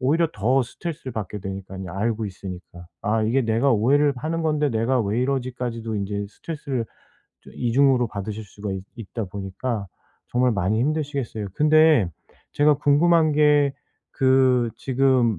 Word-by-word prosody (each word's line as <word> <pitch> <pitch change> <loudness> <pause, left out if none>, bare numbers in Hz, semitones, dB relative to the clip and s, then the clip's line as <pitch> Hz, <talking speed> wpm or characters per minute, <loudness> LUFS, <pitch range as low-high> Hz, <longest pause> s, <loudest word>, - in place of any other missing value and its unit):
오히려 160 +5 +2
더 125 +6 +2
스트레스를 150 0 -6
받게 105 -1 -5
되니까요, 95 -1 -6
알고 110 +2 -1
있으니까. 90 -2 -9 0.2
아 110 +1 +1
이게 120 +5 +2
'내가 115 +5 +2
오해를 140 +6 +3
하는 160 +5 -2
건데 150 -2 +1
내가 115 +3 +1
왜 110 +2 0
이러지?'까지도 125 -4 -2
이제 100 0 -3
스트레스를 140 -3 -4 0.4
또 - - -20
2 120 - -1
중으로 130 -2 +4
받으실 105 +2 -5
수가 100 0 -6
있 95 -1 -4
있다 115 0 -5
보니까 100 +3 -4 0.4
정말 125 +1 +2
많이 100 +3 0
힘드시겠어요. 140 -7 -2
근데 155 - +4 0.4
제가 150 0 +4
궁금한 155 +3 +3
게 145 -2 +4 0.4
그 130 -3 +3
지금 130 -5 +2
125 Hz, 330 characters per minute, -23 LUFS, 105-140 Hz, 0.4 s, 중으로